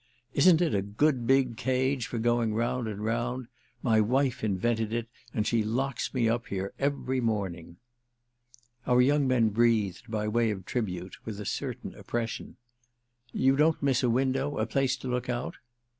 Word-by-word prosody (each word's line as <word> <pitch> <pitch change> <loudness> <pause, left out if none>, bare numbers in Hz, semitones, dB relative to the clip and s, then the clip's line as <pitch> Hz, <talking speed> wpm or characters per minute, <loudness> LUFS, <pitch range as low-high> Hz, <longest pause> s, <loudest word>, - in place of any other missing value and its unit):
"Isn't 165 +3 +5
it 170 -4 +2
a 100 - +2
good 120 +5 +1
big 130 -3 +3
cage 130 0 0
for 120 - -4
going 115 -1 +1
round 120 +1 0
and 105 -1 -5
round? 120 +3 -1 0.4
My 110 -3 +4
wife 130 +3 +1
invented 110 +2 0
it 115 0 -2 0.2
and 105 -2 -1
she 115 0 +2
locks 125 +3 -1
me 120 -4 +1
up 120 +1 0
here 95 0 -3
every 135 -2 0
morning." 95 -7 -2 1.1
Our 125 0 +4
young 140 +2 +4
man 120 -4 +3
breathed—by 110 -1 +1
way 115 +1 +2
of 95 -3 -4
tribute—with 100 -1 -4
a 105 - -5
certain - - -4
oppression. 115 -1 -4 0.7
"You 135 +1 +3
don't 155 +1 +2
miss 135 -3 +2
a 125 - +2
window—a 135 +3 0
place 135 -1 0
to 130 - -7
look 125 0 -2
out?" 120 0 -3
120 Hz, 160 wpm, -28 LUFS, 110-130 Hz, 1.1 s, Isn't